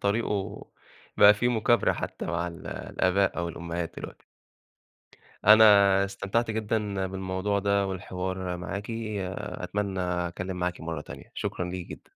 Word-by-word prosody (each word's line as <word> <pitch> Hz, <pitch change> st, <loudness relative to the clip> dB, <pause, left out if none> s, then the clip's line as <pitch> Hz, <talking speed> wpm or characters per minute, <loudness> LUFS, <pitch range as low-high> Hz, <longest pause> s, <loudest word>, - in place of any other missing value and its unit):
طريقُه، 100 Hz, -1 st, -1 dB, 0.5 s
بقى 105 Hz, +1 st, +8 dB
في 120 Hz, +4 st, +1 dB
مُكابرة 120 Hz, 0 st, +3 dB
حتى -, -, -5 dB
مع 85 Hz, -, -1 dB
ال 85 Hz, -1 st, -8 dB
الآباء 95 Hz, 0 st, 0 dB
أو 85 Hz, 0 st, -1 dB
الأمهات 85 Hz, 0 st, -4 dB
دلوقتي. -, -, -9 dB, 1.2 s
أنا 100 Hz, -2 st, +7 dB
استمتعت 100 Hz, +4 st, -1 dB
جدًا 105 Hz, -3 st, -1 dB
بالموضوع 95 Hz, +2 st, -2 dB
ده، 100 Hz, 0 st, +1 dB
والحوار 95 Hz, -1 st, -4 dB
معاكِ، 100 Hz, +5 st, -5 dB
أتمنى 100 Hz, -2 st, -3 dB
أتكلم 90 Hz, +1 st, -2 dB
معاكِ 90 Hz, 0 st, -2 dB
مرّة 80 Hz, -1 st, -4 dB
تانية، -, -, -11 dB
شكرًا 90 Hz, -, -3 dB
ليكِ 90 Hz, -1 st, -5 dB
جدًا. -, -, -9 dB
95 Hz, 130 wpm, -27 LUFS, 90-105 Hz, 1.2 s, بقى